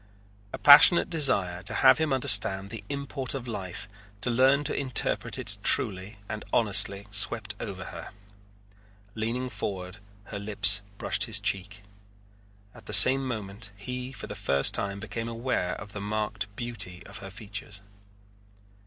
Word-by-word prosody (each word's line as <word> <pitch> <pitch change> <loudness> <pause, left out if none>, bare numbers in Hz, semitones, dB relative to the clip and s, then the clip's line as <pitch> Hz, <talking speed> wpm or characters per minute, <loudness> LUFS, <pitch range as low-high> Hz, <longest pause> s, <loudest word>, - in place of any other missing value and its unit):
A - - -6
passionate 150 +5 +7
desire 100 - +1
to - - 0
have 135 +3 +4
him 160 -2 -1
understand 100 -6 +1
the 110 -2 -8
import 140 -2 -3
of 125 -2 -7
life, 95 -5 -7 0.3
to 120 - -1
learn 135 +4 +2
to - - -2
interpret 130 -3 -1
it - - -3
truly 95 +2 +1
and 105 -1 -7
honestly, 100 -2 +2
swept 105 +1 +2
over 95 -5 -7
her. - - -10 1.0
Leaning 115 +4 -4
forward, 95 -5 -6 0.3
her 100 +1 -8
lips 100 -1 +3 0.2
brushed - - -2
his - - +1
cheek. 100 +2 -3 0.9
At - - -17
the 105 - -6
same 130 +6 +8
moment 100 -3 -6
he 125 +5 -7
for 135 - -9
the - - -8
first 70 -9 0
time 100 0 -4
became 115 +3 -6
aware 115 -6 -3
of 100 +2 -11
the 105 - -8
marked 105 -1 -4
beauty 105 -7 -6
of - - -11
her 95 - -10
features. 100 0 -9
105 Hz, 150 wpm, -26 LUFS, 100-125 Hz, 1.0 s, same